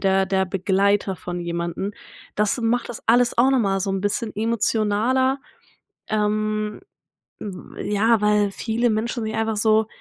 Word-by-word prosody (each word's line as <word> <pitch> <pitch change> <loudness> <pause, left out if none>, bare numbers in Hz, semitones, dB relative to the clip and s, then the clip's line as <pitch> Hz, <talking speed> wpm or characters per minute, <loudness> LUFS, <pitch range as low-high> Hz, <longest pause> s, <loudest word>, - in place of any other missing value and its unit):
der 190 0 +2
der 190 0 +1
Begleiter 195 +1 +1
von 175 0 -6
jemanden, 170 +3 -3 0.4
das 210 +3 +1
macht 235 +2 0
das 240 - -7
alles 240 +1 +3
auch 255 +3 +5
nochmal 205 -7 +2
so 195 +1 -1
'n 195 0 -1
bisschen 210 +2 -1
emotionaler. 230 +4 +1 0.7
Ähm, 215 0 -1 0.6
w 190 -3 -8
ja, 220 +2 +3
weil 210 -1 +3
viele 230 +4 -1
Menschen 230 +2 -1
sich 220 0 -4
einfach 220 -1 -1
so 220 +1 +3
210 Hz, 145 wpm, -22 LUFS, 195-225 Hz, 0.7 s, auch